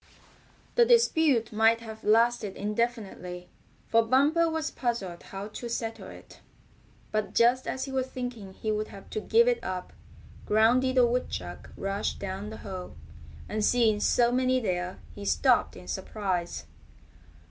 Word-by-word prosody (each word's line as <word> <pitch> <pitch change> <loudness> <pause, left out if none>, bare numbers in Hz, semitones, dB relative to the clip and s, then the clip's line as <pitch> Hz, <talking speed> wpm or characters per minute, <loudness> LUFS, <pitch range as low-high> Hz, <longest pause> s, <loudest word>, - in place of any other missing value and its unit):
The 480 - +5
dispute 320 - +3
might 225 +1 +4
have 220 -1 -9
lasted 225 -2 +3
indefinitely, 205 -5 -3 0.4
for 230 - +4
Bumper 285 +8 +3
was 320 -1 -2
puzzled 205 -9 -3
how 195 +2 -7
to 235 +3 -7
settle 225 -1 -4
it; - - -13 0.7
but 215 -1 -2
just 245 +2 +4
as 260 - -2
he 270 - -7
was 260 -1 -1
thinking 245 -7 -6
he 215 +3 -3
would 215 0 -1
have 195 -1 -13
to 215 - -2
give 465 - +4
it - - +1
up 185 -1 -5 0.5
Groundy 235 +5 +4
the 255 -1 +5
Woodchuck 165 - -3
rushed 195 +1 -2
down 195 +1 -5
the 220 - -8
hole, 185 -2 -7 0.5
and 215 0 -2
seeing 225 -2 +3
so 235 +2 +3
many 255 +1 +2
there 180 -5 -2 0.2
he 205 - -9
stopped - - +2
in - - -12
surprise. 185 -5 -3
225 Hz, 145 wpm, -28 LUFS, 200-255 Hz, 0.7 s, The